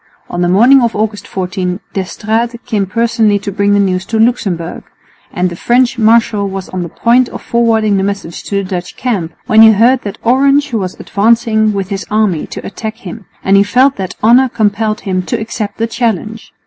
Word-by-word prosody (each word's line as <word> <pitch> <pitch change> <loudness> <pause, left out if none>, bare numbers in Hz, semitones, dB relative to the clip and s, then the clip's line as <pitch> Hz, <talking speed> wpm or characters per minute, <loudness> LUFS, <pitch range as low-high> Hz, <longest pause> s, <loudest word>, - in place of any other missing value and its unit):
On 175 - -3
the 175 - +1
morning 240 +9 +5
of 235 -1 0
August 210 -1 -3
14 180 0 -3
D'Estrades 220 +5 -2
came 210 -5 -1
personally 225 0 +1
to 200 0 -5
bring 200 +1 +1
the 205 - +3
news 185 -2 0
to 225 - -2
Luxemburg; 200 -7 -1 0.5
and 180 +1 -1
the - - -6
French 245 +5 +1
marshal 220 -2 +2
was 195 -1 -6
on 185 - -4
the 170 - -5
point 240 +7 +2
of - - -9
forwarding 225 -3 +1
the 190 - 0
message 200 -4 -4
to 200 - -4
the 200 - 0
Dutch 180 -2 -6
camp, 190 -10 -2
when 220 0 +5
he 220 0 +8
heard 240 +5 +3
that 200 0 -6
Orange 275 +3 +2
was 190 -5 -3
advancing 220 0 +1
with 195 -2 -3
his 195 -1 -5
army 210 -6 0
to - - -8
attack 220 +2 -6
him, 205 -2 -10 0.2
and 195 - +3
he 195 - +6
felt 255 +7 +2
that 185 -2 -5
honour 250 +4 +5
compelled 215 -1 -1
him 185 -2 -2
to - - -3
accept 215 -2 -5
the 225 - 0
challenge. 225 -2 -3
215 Hz, 200 wpm, -13 LUFS, 195-230 Hz, 0.5 s, he